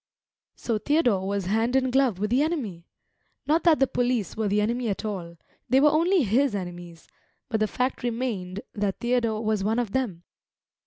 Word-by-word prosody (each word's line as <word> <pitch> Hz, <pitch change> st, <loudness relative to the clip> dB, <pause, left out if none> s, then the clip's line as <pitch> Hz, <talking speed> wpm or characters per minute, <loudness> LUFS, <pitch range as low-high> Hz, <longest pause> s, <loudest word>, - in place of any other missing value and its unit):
So 225 Hz, -3 st, -2 dB
Theodore 240 Hz, -, +1 dB
was 200 Hz, -1 st, -2 dB
hand 225 Hz, +6 st, +1 dB
in 260 Hz, -1 st, +2 dB
glove 260 Hz, -6 st, +2 dB
with 210 Hz, +3 st, -2 dB
the 255 Hz, +3 st, +3 dB
enemy! 240 Hz, -, -3 dB, 0.6 s
Not 315 Hz, +2 st, +2 dB
that 325 Hz, -3 st, +6 dB
the 270 Hz, -, +5 dB
police 245 Hz, -5 st, -1 dB
were 220 Hz, -1 st, -1 dB
the 205 Hz, +1 st, +1 dB
enemy 235 Hz, +3 st, 0 dB
at 200 Hz, -, -3 dB
all; 175 Hz, -5 st, -5 dB, 0.3 s
they 260 Hz, -, +5 dB
were 295 Hz, +2 st, +5 dB
only 335 Hz, +2 st, +3 dB
his 240 Hz, +2 st, +2 dB
enemies; 175 Hz, -3 st, -7 dB, 0.4 s
but 220 Hz, -3 st, 0 dB
the 215 Hz, -, +2 dB
fact 250 Hz, +4 st, -2 dB
remained 225 Hz, -6 st, -3 dB
that 205 Hz, -2 st, -2 dB
Theodore 230 Hz, -3 st, 0 dB
was 215 Hz, -2 st, 0 dB
one 220 Hz, +3 st, 0 dB
of 240 Hz, -5 st, -1 dB
them. 205 Hz, -10 st, -2 dB
225 Hz, 180 wpm, -26 LUFS, 200-260 Hz, 0.6 s, that